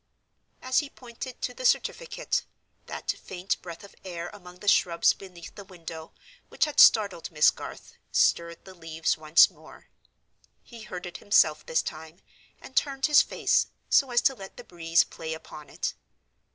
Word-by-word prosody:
As 255 0 +2
he 290 - -4
pointed 245 0 -10
to 250 - -2
the 255 - -9
certificate, 485 - 0 0.4
that - - -3
faint 185 +1 -4
breath 170 0 -9
of 200 - -14
air 175 -2 -6
among 180 -3 -13
the 205 - -12
shrubs 170 -3 +4
beneath 180 -3 -12
the 200 - -10
window, 165 -4 -10 0.4
which - - +1
had 300 - -3
startled 200 -6 +5
Miss 155 -2 +4
Garth, - - -10 0.2
stirred 170 0 +1
the 190 - -12
leaves 165 -2 -2
once 155 +1 +5
more. - - -17 0.7
He 235 -2 -13
heard 185 -4 -7
it 175 - -7
himself 155 -7 +3
this 160 - +1
time, 160 +2 -8 0.4
and 265 - -14
turned 270 -2 +1
his 300 -1 +6
face, - - +1 0.2
so 275 - +4
as 240 -1 +2
to 270 - +3
let 195 -6 -11
the - - -9
breeze 165 -1 +2
play 160 -1 -6
upon 150 -1 -12
it. - - -3
180 Hz, 165 wpm, -27 LUFS, 165-235 Hz, 0.7 s, his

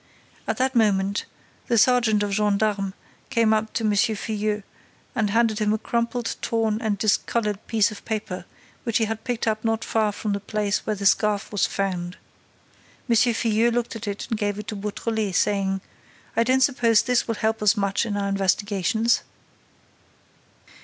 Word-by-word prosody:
At - - -1
that 260 +1 +1
moment, 200 -4 +2 0.4
the 235 - +2
sergeant 225 -2 +4
of 205 - -2
gendarmes 205 -1 +1 0.4
came 225 -1 +3
up 220 0 0
to 230 - -1
M. 215 - +2
Filleul 210 -1 0 0.5
and 220 -5 0
handed 225 0 +2
him 210 -1 +1
a - - +1
crumpled, 235 +2 -2
torn 225 -1 0
and 215 -3 0
discolored 210 0 0
piece 220 -1 +2
of 210 - -10
paper, 210 -4 -4 0.4
which 230 -3 +1
he 225 - +2
had 220 0 -4
picked 245 -2 -2
up 215 -1 0
not 225 -1 0
far 220 -2 +1
from 205 0 -3
the 200 - -1
place 210 0 -2
where 215 - 0
the 200 0 -5
scarf 205 +1 +2
was 205 -3 +2
found. 180 -2 -3 0.9
M. 235 - +3
Filleul 230 0 +3
looked 240 0 -2
at 225 -1 -6
it 205 0 -3
and 225 -3 -2
gave 205 -1 -1
it 210 0 -7
to 215 - -4
Beautrelet, 210 0 -2
saying: 195 -1 +1 0.5
"I 230 - +4
don't 260 +2 +2
suppose 235 -5 +4
this 250 -1 +1
will 230 - -1
help 220 +1 -1
us 210 +1 +4
much 200 -1 +1
in 210 -3 -2
our 200 0 -1
investigations." 200 +3 +1
215 Hz, 175 wpm, -24 LUFS, 205-230 Hz, 0.9 s, sergeant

